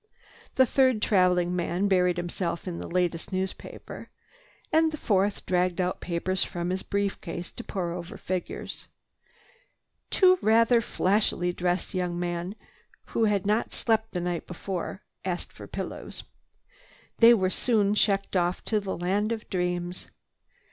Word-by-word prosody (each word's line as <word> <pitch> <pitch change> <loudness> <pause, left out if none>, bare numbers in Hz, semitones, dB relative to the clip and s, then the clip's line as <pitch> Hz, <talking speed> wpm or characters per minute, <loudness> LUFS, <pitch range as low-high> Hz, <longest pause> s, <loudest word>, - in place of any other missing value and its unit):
The 260 - +6
third 260 -3 +3
traveling 180 -3 +3
man 180 +2 0
buried 180 -2 +3
himself 175 +1 -3
in 170 -2 -4
the - - -6
latest 175 -1 -1
newspaper, 190 0 -5 0.6
and 320 0 +4
the 305 - -5
fourth 200 -5 +1
dragged 180 0 +1
out 180 0 -1
papers 185 +2 -1
from 175 0 -3
his 190 +1 -1
brief 200 0 -1
case 170 0 -6
to 240 - -8
pour 180 -6 -3
over 175 0 -7
figures. 185 -1 -5 1.2
Two 370 -1 +5
rather 230 +2 +5
flashily 185 -4 +1
dressed 175 +1 -1
young 180 -2 -1
men, 175 +2 -3 0.5
who 225 - +2
had 205 -2 +1
not 210 +3 +1
slept 220 -1 +1
the 180 - -1
night 175 -1 -3
before, 185 +2 -5 0.2
asked 180 -2 -3
for - - -10
pillows. - - -6 0.9
They 235 0 +8
were 190 -3 +1
soon 210 -4 +2
checked 200 -2 +1
off 175 0 0
to 215 - +1
the 195 -2 -4
land 200 +5 0
of 225 -2 -4
dreams. 180 -1 -2
185 Hz, 145 wpm, -27 LUFS, 175-210 Hz, 1.2 s, They